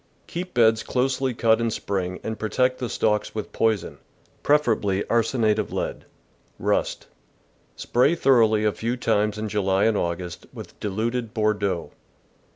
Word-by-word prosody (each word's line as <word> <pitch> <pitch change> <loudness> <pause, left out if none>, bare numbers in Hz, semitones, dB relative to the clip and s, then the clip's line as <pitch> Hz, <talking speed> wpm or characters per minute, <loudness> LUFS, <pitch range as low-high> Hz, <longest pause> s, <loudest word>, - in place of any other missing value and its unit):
— - - -38
Keep 180 -1 -6
beds 110 -2 +4
closely 130 +1 0
cut 115 0 +3
in 115 - +1
spring 95 -4 -3
and 110 0 -4
protect 125 +4 +1
the 125 -2 -3
stalks 105 0 0
with 110 - -4
poison, 110 -4 0 0.4
prefer 150 -5 +3
ably 100 -2 -1
arsenate 115 -2 +2
of - - -3
lead. - - -4 0.5
Rust. - - -1 0.4
— - - -38
Spray 125 +7 +2
thoroughly 115 -8 +4
a 105 - +3
few 115 +4 -3
times 105 -3 +1
in 110 0 -3
July 100 -2 +1
and 110 -1 +3
August 85 -2 -3
with - - -11
diluted 110 +3 -2
Bordeaux. 100 -5 0
110 Hz, 155 wpm, -24 LUFS, 105-120 Hz, 0.5 s, beds